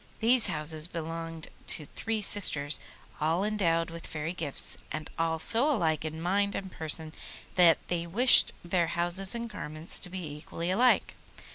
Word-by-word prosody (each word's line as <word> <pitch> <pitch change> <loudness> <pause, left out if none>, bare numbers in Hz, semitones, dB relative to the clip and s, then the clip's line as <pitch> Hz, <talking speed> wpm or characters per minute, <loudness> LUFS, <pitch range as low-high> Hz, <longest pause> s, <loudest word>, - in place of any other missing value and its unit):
These 235 +1 +3
houses 155 +1 -2
belonged 165 -1 -7 0.2
to 150 - 0
three 220 +7 -4
sisters, 150 -8 +2 0.4
all 160 +5 0
endowed 170 -6 -1
with 165 0 -8
fairy 155 +2 -5
gifts, 155 -6 +2
and 155 0 -6
all 165 0 0
so 235 - +6
alike 160 - -1
in 160 0 -6
mind 200 +4 -1
and 190 -1 -6
person 160 0 -1 0.4
that 175 -3 +5
they 170 -1 -3
wished 240 +9 +7
their 175 -1 0
houses 180 +5 -1
and 235 0 -5
garments 155 -6 -5
to 180 - -5
be 185 -1 -6
equally 150 +4 -6
alike. 245 +6 +2
170 Hz, 155 wpm, -28 LUFS, 160-200 Hz, 0.4 s, wished